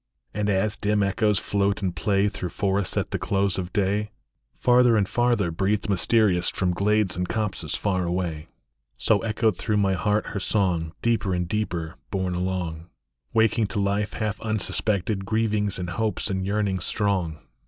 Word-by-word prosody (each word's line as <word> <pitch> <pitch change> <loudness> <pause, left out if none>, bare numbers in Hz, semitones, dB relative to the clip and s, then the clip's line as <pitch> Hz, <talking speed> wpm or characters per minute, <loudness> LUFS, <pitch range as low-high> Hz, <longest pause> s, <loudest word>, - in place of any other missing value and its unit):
And 105 0 -1
as 100 +2 +1
dim 105 0 +1
echoes 105 +1 +2
float 100 0 0
and 90 -2 -1
play 100 -1 +2
Through 95 -3 -4
forests 100 +1 -1
at - - -1
the - - -1
close 100 -1 0
of 90 -1 -4
day, 105 +1 0 0.5
Farther 125 -2 +4
and 100 -2 +2
farther, 120 -6 +1
breathed 100 +5 0
mysterious 95 -1 +3
From 90 -2 0
glades 105 0 +1
and 90 0 -2
copses 110 -3 -2
far 95 -3 0
away, 85 -3 -2 0.5
So 105 - +3
echoed 110 -1 +1
through 105 - 0
my 100 -2 +2
heart 105 +3 +1
her 100 - -2
song, 90 -5 0
Deeper 110 -5 +1
and 90 -1 -1
deeper 90 -5 -3
borne 95 -3 -1
along, 90 -2 -3 0.5
Waking 110 -1 +3
to 105 - -2
life 100 +1 0
half 110 -1 -3
unsuspected 105 -2 0
Grievings 105 -1 0
and 90 -1 -4
hopes 105 0 -1
and 95 0 -1
yearnings 100 -2 0
strong. 95 -7 0
100 Hz, 165 wpm, -25 LUFS, 90-105 Hz, 0.5 s, Farther